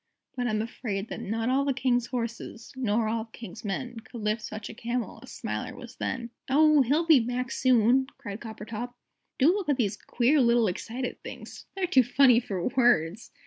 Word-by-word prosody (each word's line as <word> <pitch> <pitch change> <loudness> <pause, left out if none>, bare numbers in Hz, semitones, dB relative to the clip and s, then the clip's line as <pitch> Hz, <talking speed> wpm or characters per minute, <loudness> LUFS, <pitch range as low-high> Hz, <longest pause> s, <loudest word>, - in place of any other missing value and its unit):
But 245 -1 -1
I'm 215 -1 0
afraid 220 -3 -4
that - - -5
Not 225 +3 -2
all 270 +2 +3
the 275 -2 0
King's 245 -2 +1
horses, 230 -1 -5
Nor 230 -3 +1
all 225 0 -1
the 225 - -16
King's 225 0 -9
men, 230 +4 -4
Could 230 +1 -10
lift 215 +2 0
such 215 0 -6
a - - -8
Camel 235 -1 -3
As - - -12
Smiler 105 0 -4
was 245 -1 -11
then. 240 -2 -3 0.2
"Oh, 305 +1 +6
he'll 290 +7 +2
be 320 -5 +7
back 245 +2 -2
soon!" 255 0 +3
cried 205 +1 -7
Coppertop. 225 +2 -6 0.4
"Do 295 +7 +5
look 395 -5 -3
at 285 - +3
these 205 -5 0
queer 265 +4 +2
little 235 -1 +4
excited 240 +7 -4
things. - - -9
They're 385 -1 0
too 270 -7 +5
funny 250 0 +5
for 195 -6 -2
words!" 235 - +2
240 Hz, 190 wpm, -28 LUFS, 220-260 Hz, 0.4 s, be